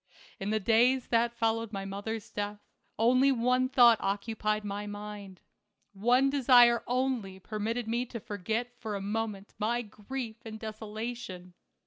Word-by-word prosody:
In 195 - -3
the 215 0 +1
days 235 +5 +3
that 235 0 +2
followed 225 -1 0
my 195 -2 -4
mother's 205 +2 -5
death 205 0 -3 0.4
only 255 +5 +4
one 250 +1 +2
thought 240 -4 +6
occupied 215 +1 -1
my 205 +1 -4
mind. 205 -2 -8 0.5
One 245 +7 +3
desire 245 -3 +6
only 250 -6 -1
permitted 220 +4 -3
me 240 +2 -1
to 230 - -6
forget 225 +3 -3
for 220 -3 -4
a - - -3
moment 205 0 -3
my 235 +3 0
grief 225 +2 -6
and 220 -1 -8
desolation. 215 -4 -6
225 Hz, 140 wpm, -30 LUFS, 205-240 Hz, 0.5 s, thought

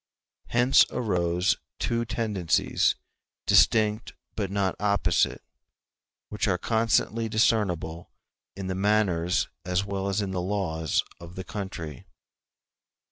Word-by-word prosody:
Hence 120 +3 +5
arose 90 -5 0 0.2
two 115 0 -1
tendencies, 110 -6 +1 0.5
distinct 110 0 +3 0.2
but 100 -3 -2
not 100 -1 0
opposite, 100 0 +1 0.9
which 105 +1 -1
are 90 -3 +2
constantly 115 +1 +1
discernible 95 -7 0 0.5
in 95 0 -6
the 95 - -2
manners 95 -3 +1 0.2
as 90 +2 0
well 100 -1 -3
as 100 - 0
in 100 -2 -2
the 90 -1 -2
laws 90 -5 -1 0.2
of 85 +1 -11
the 95 - -5
country. 90 -9 -7
100 Hz, 110 wpm, -26 LUFS, 90-110 Hz, 0.9 s, Hence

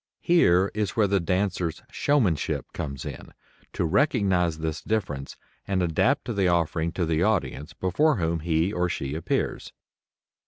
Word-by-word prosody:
Here 95 - +4
is 105 -2 -2
where 110 - +4
the 100 0 +2
dancer's 90 -1 -1
showmanship 110 - 0
comes 70 -3 -5
in - - -8 0.4
to - - -1
recognize 95 - +2
this 80 -1 -3
difference 75 -11 -3 0.3
and 95 -2 0
adapt 80 -2 +1
the 95 -2 +2
offering 85 -1 +1
to 90 - -1
the 80 0 0
audience 80 -7 0
before 100 - +2
whom 85 -4 -1
he 80 +4 0
or 90 -2 0
she 70 -4 -3
appears. 80 +1 -2
90 Hz, 145 wpm, -26 LUFS, 80-100 Hz, 0.4 s, Here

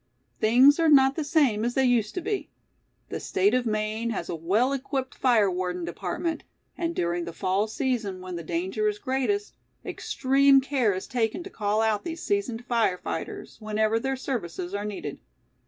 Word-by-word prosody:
Things 255 +8 +6
are 325 -1 +4
not 270 -2 +6
the 315 - -2
same 280 -8 +2
as 240 +1 -1
they 265 - +3
used 235 -4 +1
to 365 - -2
be. 405 +4 -3 0.6
The - - -4
State 195 +4 +1
of 250 -1 +1
Maine 215 +1 -1
has 200 -6 -4
a - - -2
well 205 - +1
equipped 265 -1 -3
fire 225 -7 +3
warden 180 -1 -2
department; 190 - -3 0.3
and 335 0 -2
during 170 0 -1
the 170 - -5
fall 190 +5 0
season 220 -5 -2
when 185 -1 -7
the 170 - -4
danger 185 +6 -1
is 210 -1 0
greatest, 270 - -1 0.3
extreme 275 +1 +3
care 265 -5 +1
is 185 - -5
taken 240 +7 -1
to 385 - -9
call 210 0 0
out 220 -2 +1
these 330 -1 -5
seasoned 245 - -1
fire 230 -6 +1
fighters - - -6
whenever 215 +1 0
their 270 +3 -1
services 185 -9 -4
are 205 +1 -2
needed. 195 -9 -5
225 Hz, 180 wpm, -26 LUFS, 195-270 Hz, 0.6 s, Things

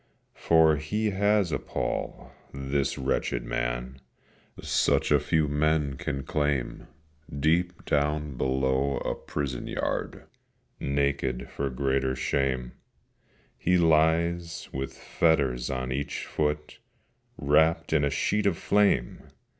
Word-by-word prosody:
For 80 -2 +4
he 105 +9 -1
has 100 -2 +2
a - - 0
pall, - - -4 0.2
this 70 0 -1
wretched 65 -2 -1
man, - - -3 0.6
Such - - +1
as - - +5
few 80 -1 +1
men 75 0 +1
can 70 +1 -4
claim: 75 -4 -1 0.5
Deep 85 +4 +1
down 75 0 0
below 65 +2 0
a - - -2
prison 70 -4 -4
yard, - - -3 0.6
Naked 70 -2 -1
for 70 -1 -2
greater 65 0 0
shame, 65 -1 -1 0.9
He 90 +1 +3
lies, 85 +1 +2
with 65 0 -4
fetters 70 -7 +1
on 65 -1 -3
each 70 +2 -3
foot, 75 0 -2 0.6
Wrapt 80 +3 +2
in - - +3
a 70 - +2
sheet 100 +8 0
of 90 -5 +1
flame! 100 -13 +1
70 Hz, 115 wpm, -27 LUFS, 65-80 Hz, 0.9 s, as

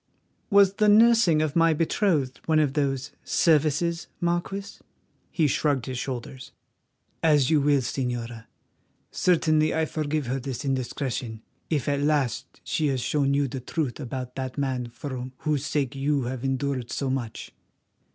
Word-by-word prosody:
"Was 200 -1 +5
the 210 -1 +4
nursing 215 -7 +5
of 150 -2 -2
my 165 -1 +4
betrothed 155 -5 0
one 160 -1 +3
of 150 -3 +2
those 135 -2 -1
services, 165 +1 +2
Marquis?" 175 +3 -2 0.5
He 165 - +1
shrugged 140 -3 +1
his 130 -2 -4
shoulders. 130 0 -6 0.7
"As 150 -4 +3
you 155 -2 +4
will, 145 -1 +3
Señora. 120 -3 -4 0.7
Certainly 155 -3 +2
I 160 0 +1
forgive 155 -1 -2
her 130 +3 -2
this 135 +1 -5
indiscretion, 125 -3 -3 0.3
if 150 -5 -1
at 140 -1 +1
last 145 -5 -1
she 155 - 0
has 135 -3 0
shown 140 +2 +1
you 140 0 +2
the 130 +1 -5
truth 135 +1 -3
about 125 -2 -5
that 130 0 -4
man 130 -3 -1
for 125 +1 -6
whose 150 -2 -1
sake 140 -3 -1
you 140 0 0
have 125 +1 -4
endured 135 -2 -1
so 135 -2 -2
much. 125 -4 -4
140 Hz, 150 wpm, -26 LUFS, 130-155 Hz, 0.7 s, Was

